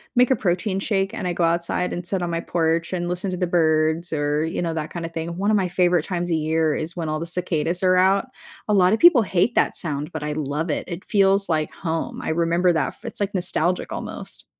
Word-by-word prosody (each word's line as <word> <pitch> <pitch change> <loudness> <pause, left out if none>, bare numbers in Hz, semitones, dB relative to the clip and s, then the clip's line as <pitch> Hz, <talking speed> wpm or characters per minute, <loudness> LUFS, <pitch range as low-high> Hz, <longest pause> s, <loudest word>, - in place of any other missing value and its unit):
make 250 +1 +4
a - - +5
protein 190 +1 -1
shake 195 0 -1
and 185 - -3
I 175 - -1
go 170 - -1
outside 170 +2 0
and 175 - -5
sit 190 -1 -1
on 175 - -2
my 165 - -1
porch 165 0 0
and 175 -1 -2
listen 180 +2 -2
to 180 - -3
the 180 - 0
birds 160 0 +1
or, 150 +1 0
you 165 - -3
know, 165 -2 -1
that 155 -1 -4
kinda 170 -1 -5
thing. 165 +1 -5
One 200 +2 +1
of 210 - +4
my 190 - +1
favorite 175 -2 +2
times 175 -1 -2
a - - +3
year 160 0 +1
is 165 +3 -4
when 165 -3 -3
all 155 0 -1
the 165 - -4
cicadas 175 0 -2
are 185 0 +4
out. 195 +4 +3 0.4
A 210 - +1
lotta 190 +2 +4
people 300 -4 +7
hate 190 +5 +1
that - - +2
sound, 150 -3 -2
but 155 -1 -5
I 150 0 -2
love 150 +2 -3
it, - - -2
it 175 +1 -7
feels 195 -2 +2
like 155 -1 0
home. 165 -2 -4
I - - -4
remember 170 +2 +2
that 160 - +1
f - - -16
It's, - - -4
like, 205 0 -1
nostalgic 180 0 0
almost. - - -7
175 Hz, 245 wpm, -23 LUFS, 160-185 Hz, 0.4 s, people